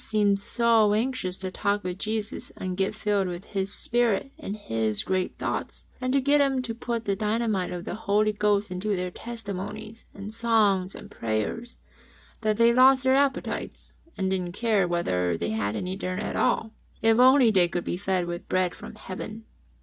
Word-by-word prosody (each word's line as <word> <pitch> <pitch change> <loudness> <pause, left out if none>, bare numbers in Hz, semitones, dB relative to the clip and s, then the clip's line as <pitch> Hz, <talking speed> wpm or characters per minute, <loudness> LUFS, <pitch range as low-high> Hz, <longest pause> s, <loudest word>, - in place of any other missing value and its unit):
lOQ - - -7
seemed 205 -2 +2
so 225 -1 +3
anxious 220 -6 -1
to 190 -1 -5
talk 205 +1 -1
with 180 +1 -4
Jesus 215 -1 -3
and 185 -1 -3
get 195 +2 0
filled 205 -2 0
with 175 +1 -6
His 195 0 0
Spirit, 240 +3 +1
and 200 - -5
His 110 - -1
great 185 -1 -1
thoughts, - - -4 0.2
and 255 0 0
to 275 - +3
get 285 +2 +3
Him 270 -2 +1
to 235 -2 -4
put 230 -1 -4
the 200 - +1
dynamite 215 -2 0
of 175 -1 -5
the - - -4
Holy 215 0 +1
Ghost 205 -1 +1
into 200 +3 -1
their 180 0 -3
testimonies 215 0 -6
and 205 +2 -8
songs 215 -5 +2
and 205 - -11
prayers, 115 - -3 0.6
that 215 -1 +1
they 235 0 +5
lost 260 +1 +6
their 260 0 +4
appetites, 275 -1 -2 0.2
and 190 -1 0
didn^t 180 -2 -1
care 210 -3 +2
whether 90 - 0
they 85 - -2
had 110 -1 -1
any 185 +9 -3
dinner 185 -1 -3
at - - -3
all, 225 - +1 0.3
if 225 +1 +4
only 255 -2 +7
they 185 -4 +4
could 175 0 -3
be - - -2
fed 185 -1 -1
with 175 0 -6
bread 185 -1 +1
from - - -10
Heaven. 215 +4 -7
205 Hz, 190 wpm, -26 LUFS, 185-230 Hz, 0.6 s, only